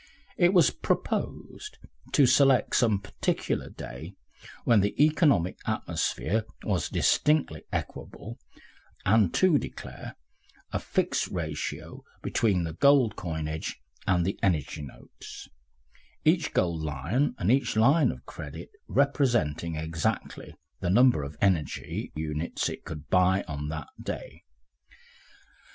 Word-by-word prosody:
It 175 -1 +4
was 180 -3 +5
proposed 425 +2 -3 0.4
to 140 - +6
select 130 +1 +4
some 110 -4 +3
particular 95 - -2
day 80 +10 -9 0.5
when 115 -3 +5
the 100 +1 0
economic 150 - +3
atmosphere 110 +2 -1 0.2
was 95 -4 -1
distinctly 145 - +1
equable, - - -6 0.7
and 105 -2 +4
to 180 -6 +4
declare - - -8 0.6
a - - -1
fixed - - 0
ratio - - -5 0.2
between 100 -6 +1
the 80 -1 -4
gold 130 - +4
coinage 80 -3 -4 0.3
and 90 -2 +2
the 95 - -2
energy 80 -6 0
notes; 70 -3 -11 0.8
each 160 0 +3
gold 85 -3 0
Lion 80 - -1
and 95 +3 +1
each 135 -2 +2
Lion 135 +9 +4
of - - -11
credit - - -9 0.2
representing 120 - +1
exactly 80 0 -3 0.2
the 90 - -2
number 120 - +5
of 70 +1 -7
energy 90 -7 -1
units 75 +1 -2
it - - -7
could 75 -1 -8
buy 95 +1 +3
on 75 -1 -4
that 75 -2 -5
day. - - -6
95 Hz, 115 wpm, -27 LUFS, -, 0.8 s, to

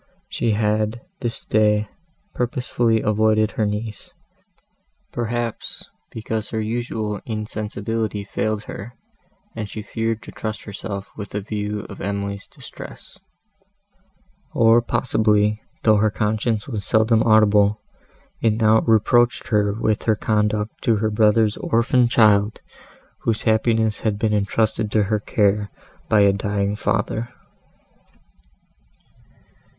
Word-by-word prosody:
She 115 - 0
had, 110 +2 0 0.2
this 120 -3 -4
day, 105 0 +2 0.5
purposely 120 -3 0
avoided 110 0 +2
her 110 - 0
niece; 105 +1 -5 1.0
perhaps, 120 -1 -4 0.2
because 110 -1 -4
her 110 - -2
usual 110 -2 -3
insensibility 105 -1 -3
failed 110 +1 -2
her, 115 +5 -8 0.6
and 105 -2 -4
she 105 +1 -6
feared 115 0 -2
to - - -10
trust 110 -1 -5
herself 100 -1 -6
with 100 -2 -7
a - - 0
view 105 0 -3
of - - -10
Emily's 100 0 -3
distress; - - -12 1.4
or 115 +1 +5
possibly, 105 -3 +1 0.2
though 110 -1 +5
her 110 +1 +3
conscience 105 +2 -1
was 110 -6 -4
seldom 110 +2 +3
audible, 105 -2 +4 0.6
it 115 -2 +3
now 110 0 +5
reproached 120 +2 +3
her 105 -3 +2
with 110 0 0
her 110 - +3
conduct 105 0 -1
to 115 - +2
her 110 +1 0
brother's 105 0 +3
orphan 120 +2 +2
child, 105 -2 +3 0.6
whose 115 -2 -1
happiness 110 -1 +2
had 105 -2 -1
been 105 0 0
entrusted 105 +1 0
to 105 0 +2
her 105 +1 0
care 105 -1 +1 0.4
by 105 - +5
a 100 -1 +5
dying 100 0 -1
father. 110 +2 -1
110 Hz, 120 wpm, -22 LUFS, 105-115 Hz, 1.4 s, or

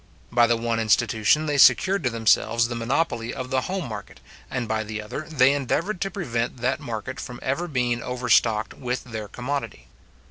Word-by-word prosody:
By 120 0 +5
the 120 0 +2
one 115 0 -1
institution, 115 +5 +2
they 145 -2 0
secured 185 - +5
to - - +3
themselves 115 0 +2
the 120 - -3
monopoly 120 0 -1
of 130 -1 -6
the 130 0 +2
home 185 +1 -3
market, 105 -3 -8 0.3
and 125 -2 -3
by 110 0 -1
the 110 0 -5
other 120 +8 -6
they 135 -3 +4
endeavoured 165 - -1
to 195 - 0
prevent 125 - -3
that 125 +3 -1
market 120 -3 -5
from 125 -1 -7
ever 150 +7 -1
being 125 -5 0
overstocked 120 -3 +1
with 125 -1 -4
their 110 -4 -6
commodity. 125 - -5
120 Hz, 180 wpm, -24 LUFS, 115-140 Hz, 0.3 s, By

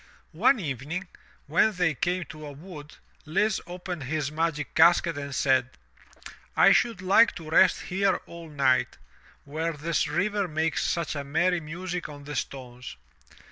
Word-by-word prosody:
One 270 - +3
evening, 155 - -4 0.4
when 170 +9 +3
they 180 -4 +1
capie 175 +5 -1
to 155 -1 -9
a - - -7
wood, 150 -1 -11 0.3
Lise 200 +6 +1
opened 175 -4 -6
his 150 +1 -2
magic 155 -2 -2
casket 170 0 +5
and* 140 -1 -5
said: 130 -2 +2 0.9
"I - - +7
should 225 -6 +2
like 200 +5 +5
to 160 -2 -9
rest 185 +3 +5
here 190 +1 +1
all 170 -1 -10
night, 135 -3 +1 0.5
where 160 +3 -3
this 155 +2 -1
river 205 -1 0
makes 160 0 -1
such 170 -2 -1
a 140 - -3
merry 175 +5 +1
music 175 +3 -5
on 145 -1 -10
the 150 +1 -7
stones." 125 - -6
160 Hz, 150 wpm, -27 LUFS, 145-180 Hz, 0.9 s, I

